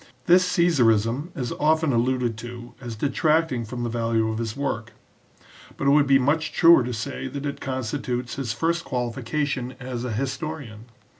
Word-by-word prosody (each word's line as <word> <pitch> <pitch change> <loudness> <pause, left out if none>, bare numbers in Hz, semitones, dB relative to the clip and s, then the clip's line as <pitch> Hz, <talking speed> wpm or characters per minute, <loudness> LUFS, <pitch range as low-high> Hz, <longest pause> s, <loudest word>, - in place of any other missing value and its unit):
This 180 +1 +5
Caesarism 125 -4 +3
is 125 -6 -3
often 155 -1 +2
alluded 120 0 +1
to 120 +1 -9
as 120 -3 -6
detracting 150 0 +1
from 120 +2 -5
the 120 - -1
value 115 -1 0
of 110 0 -3
his 115 0 -4
work, 115 -5 -3 0.8
but - - -3
it 140 - +5
would 145 0 +5
be 135 0 +6
much 150 +5 +1
truer 165 -5 +6
to 125 - -3
say 130 +4 -4
that 140 +2 -6
it 140 - -4
constitutes 130 -1 -3
his 135 -5 -3
first 165 +7 0
qualification 130 +1 -2
as 125 -2 -5
a 125 - -3
historian. 130 -2 -4
130 Hz, 165 wpm, -24 LUFS, 115-145 Hz, 0.8 s, be